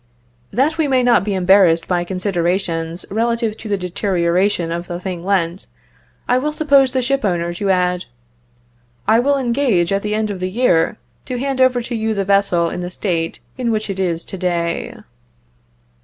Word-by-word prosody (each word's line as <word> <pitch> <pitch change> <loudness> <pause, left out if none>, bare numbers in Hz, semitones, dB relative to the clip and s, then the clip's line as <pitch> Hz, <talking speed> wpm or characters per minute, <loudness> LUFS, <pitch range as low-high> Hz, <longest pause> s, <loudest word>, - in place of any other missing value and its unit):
That 295 +8 +1
we 310 - +2
may 260 -2 +2
not 240 -6 +4
be 200 -1 -1
embarrassed 185 -3 +4
by 175 -1 0
considerations 175 -2 -1
relative 230 0 0
to 220 - -8
the 200 - +1
deterioration 180 -1 0
of 170 +1 -4
the 175 -1 -5
thing 180 -2 -5
lent, 180 -2 -1 0.6
I 250 - +3
will 300 +3 -1
suppose 280 -4 +3
the 260 -1 0
ship 275 +1 0
owner 175 -3 0
to 195 +3 -2
add, 180 -1 +1 1.0
"I 225 +1 +5
will 280 +3 +2
engage, 235 -9 +1
at 195 - +1
the 210 +1 -2
end 215 -1 -1
of 195 - -5
the 185 0 -2
year, 200 -4 +2 0.3
to 255 - -3
hand 270 +1 -1
over 255 -2 +3
to 240 - -6
you 220 -1 -1
the 195 -1 -1
vessel 195 -4 +2
in - - -4
the 180 - -4
state 170 -3 -3 0.2
in 245 -2 0
which 215 -2 -1
it 190 - -6
is 170 -3 -1
to 190 - -8
day." 170 -2 -2
195 Hz, 185 wpm, -19 LUFS, 175-235 Hz, 1.0 s, I